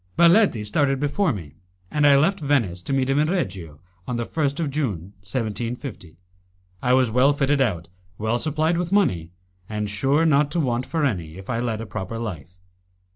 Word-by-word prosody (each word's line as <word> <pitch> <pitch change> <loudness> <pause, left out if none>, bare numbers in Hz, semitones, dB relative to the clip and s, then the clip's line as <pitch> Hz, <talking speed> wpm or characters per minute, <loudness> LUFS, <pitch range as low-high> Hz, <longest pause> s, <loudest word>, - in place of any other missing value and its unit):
Baletti 170 - +5
started 135 +5 +1
before 150 +5 +1
me, 85 - -8 0.3
and 150 -1 +3
I 140 - +7
left 175 +8 +2
Venice, 125 - 0
to 90 - -6
meet 135 -1 +1
him 135 +2 +2
in 155 +1 +2
Reggio, 90 - -3 0.3
on 125 - -2
the 120 - -2
1st 145 0 -1
of 155 -4 -1
June, 105 - -3
1750. 115 - -5 0.6
I 125 - +1
was 130 -3 +4
well 130 +5 +4
fitted 140 0 +1
out, 90 -10 0 0.3
well 110 +3 0
supplied 160 +3 +1
with 175 0 -3
money, 90 - +2 0.4
and 105 -1 -2
sure 135 +10 +2
not 145 -2 +3
to 175 - 0
want 125 -4 -1
for 160 -3 0
any, 85 - -3
if 95 +5 -7
I 115 - -1
led 115 -2 -2
a - - -5
proper 95 +2 -5
life. 90 -7 -6
125 Hz, 185 wpm, -23 LUFS, 105-145 Hz, 0.6 s, I